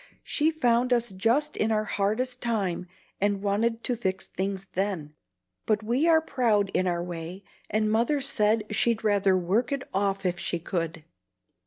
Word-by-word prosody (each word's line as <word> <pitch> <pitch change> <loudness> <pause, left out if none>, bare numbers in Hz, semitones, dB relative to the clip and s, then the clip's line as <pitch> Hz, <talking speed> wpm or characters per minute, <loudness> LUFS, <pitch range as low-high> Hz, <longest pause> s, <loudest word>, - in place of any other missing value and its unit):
"She 305 +1 +1
found 250 -5 +2
us 240 -2 0
just 235 +11 +1
in 220 +1 0
our 215 -1 +2
hardest 220 +5 -1
time, 195 -7 -1 0.3
and 200 0 +1
wanted 225 +3 0
to 245 - 0
fix 190 -4 -2
things 195 0 -3
then; 185 -6 -2 0.5
but 215 0 +1
we 245 +9 +1
are 320 -1 +5
proud 220 -10 +1
in 185 - +1
our 175 -1 0
way, 175 +2 -6 0.3
and 215 0 +1
Mother 235 +7 +2
said 220 -5 +2
she'd 225 +1 +1
rather 200 -3 +3
work 200 +8 0
it 275 -1 -1
off 195 0 0
if 180 -1 0
she 175 - -1
could. 165 -2 -3
210 Hz, 165 wpm, -27 LUFS, 190-235 Hz, 0.5 s, are